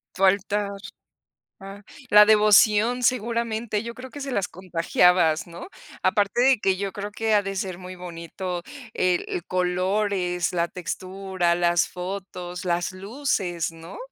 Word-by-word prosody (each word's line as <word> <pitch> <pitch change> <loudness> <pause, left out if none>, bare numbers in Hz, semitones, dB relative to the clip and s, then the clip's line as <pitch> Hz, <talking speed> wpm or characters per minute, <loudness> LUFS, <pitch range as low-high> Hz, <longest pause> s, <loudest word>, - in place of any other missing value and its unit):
Faltar. 200 +1 +1 0.9
Ah, 200 +1 -10 0.3
la 210 0 +8
devoción 215 +3 +5
seguramente, 230 -2 0
yo 235 0 -6
creo 255 +2 -10
que 290 - -10
se 275 -1 -5
las 200 -6 0
contagiabas, 175 -2 +2
¿no? 170 - -10 0.3
Aparte 205 +3 +1
de 265 -1 +5
que 190 -2 +2
yo 195 0 -3
creo 205 +1 -6
que 220 0 0
ha 205 - +3
de 195 0 -4
ser 185 -2 -3
muy 185 0 -9
bonito 175 0 -6 0.3
el 180 -1 +1
el 175 - -4
color, 185 +3 0
es 180 -1 -1
la 170 -1 +1
textura, 185 0 -2
las 175 0 +2
fotos, 180 -1 -6
las 175 +1 0
luces, 195 - -2
¿no? 165 +2 -11
190 Hz, 145 wpm, -24 LUFS, 180-210 Hz, 0.9 s, la